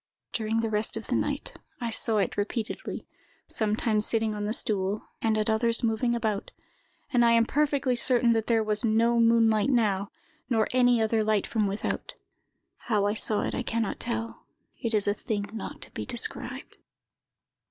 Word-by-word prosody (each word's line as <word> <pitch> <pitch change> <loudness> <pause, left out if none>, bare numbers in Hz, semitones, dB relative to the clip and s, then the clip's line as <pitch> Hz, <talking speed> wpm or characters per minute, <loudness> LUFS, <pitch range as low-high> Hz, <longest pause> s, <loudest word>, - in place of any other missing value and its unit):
"During 225 0 -1
the 225 - -1
rest 210 +1 +1
of - - -6
the - - -1
night, - - -2 0.3
I 235 -2 -3
saw 225 0 +3
it 200 - 0
repeatedly, 215 +2 -4 0.4
sometimes 215 0 +1
sitting 225 -1 0
on 210 0 -4
the 210 - -2
stool, 200 -2 0
and 220 -1 +1
at 215 - 0
others 230 +1 +2
moving 235 +1 +1
about; 215 -3 -2 0.6
and 245 -1 +4
I 235 0 +5
am 230 0 +4
perfectly 285 -2 +1
certain 240 -1 +5
that 225 -1 -1
there 225 -2 +2
was 215 +1 +2
no 230 +1 +2
moonlight 230 -1 +3
now, 210 -6 +1 0.4
nor 225 -3 +2
any 245 -1 +3
other 220 0 +1
light 215 -2 +1
from 215 -3 0
without. 200 +2 -4 0.6
How 210 -3 0
I 205 - +1
saw 215 -1 +1
it, - - -3
I - - -2
can 230 -1 -1
not 215 - -4
tell; 230 -1 -4 0.3
it 230 -3 -1
is 205 -1 +1
a 205 - +3
thing 205 -1 -4
not 220 - -7
to - - -3
be - - -6
described. 245 -2 -3
225 Hz, 180 wpm, -27 LUFS, 215-235 Hz, 0.6 s, I